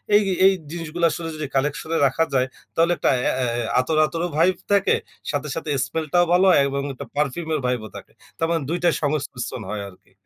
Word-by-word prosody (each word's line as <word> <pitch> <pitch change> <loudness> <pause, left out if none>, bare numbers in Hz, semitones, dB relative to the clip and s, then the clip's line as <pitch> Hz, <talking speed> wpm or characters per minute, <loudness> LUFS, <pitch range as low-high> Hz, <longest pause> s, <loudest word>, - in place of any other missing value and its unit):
এই, 210 - +7 0.2
এই 195 - +7 0.2
জিনিসগুলা 170 0 -2
আসলে 165 +1 -4
যদি 155 -1 -4
কালেকশন 150 +3 -1
এ - - +3
রাখা 135 +5 +1
যায়, 130 -1 +2 0.3
তাহলে 165 +1 +3
একটা - - +1 0.2
এ - - +3 0.3
এ - - -2 0.2
আতর, 155 +5 0
আতরও 170 +2 -2
ভাইব 180 +3 +4 0.2
থাকে। 200 -1 +4 0.4
সাথে, 145 0 -2
সাথে 160 -1 -4 0.2
স্মেল 160 +4 -3
টাও 175 0 +5
ভালো 180 +2 +5
হয় 180 - +6
এবং 140 0 -2
একটা 130 - -8
পারফিউম 150 +3 -1
এর - - 0
ভাইব 125 -1 +1
ও - - -14
থাকে। - - -12 0.3
তারমানে 165 -1 0
২ 170 - 0
টাই 170 -2 +4
সংমিশ্রণ 145 -4 -2
হয় 105 -1 -3
আরকি। 90 - -21
155 Hz, 210 wpm, -23 LUFS, 140-170 Hz, 0.4 s, এই